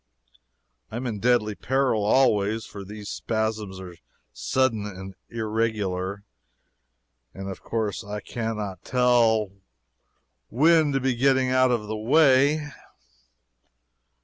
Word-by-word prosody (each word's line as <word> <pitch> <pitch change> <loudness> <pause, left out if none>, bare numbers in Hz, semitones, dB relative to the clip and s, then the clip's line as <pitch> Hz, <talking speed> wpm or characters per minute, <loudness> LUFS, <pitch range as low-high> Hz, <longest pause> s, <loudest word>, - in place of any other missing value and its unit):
I - - -8
am 125 +2 -4
in 110 -4 -3
deadly 115 -2 +2
peril 130 -2 0
always, 110 -2 +2
for 100 - -9
these 105 +1 -9
spasms 110 -4 -3
are 90 -2 -10 0.4
sudden 105 - 0
and 95 -1 -8 0.2
irregular, 105 -4 -2 1.1
and 95 0 -7
of 95 - -7
course 110 -5 -3
I 105 +1 -5
cannot 105 -3 -5
tell 120 -5 +2 1.0
when 155 +3 +4
to 135 - +1
be 130 0 0
getting 130 +1 +2
out 130 0 +4
of 120 -4 0
the 110 +1 -4
way. 140 +5 +3
110 Hz, 115 wpm, -25 LUFS, 105-130 Hz, 1.1 s, when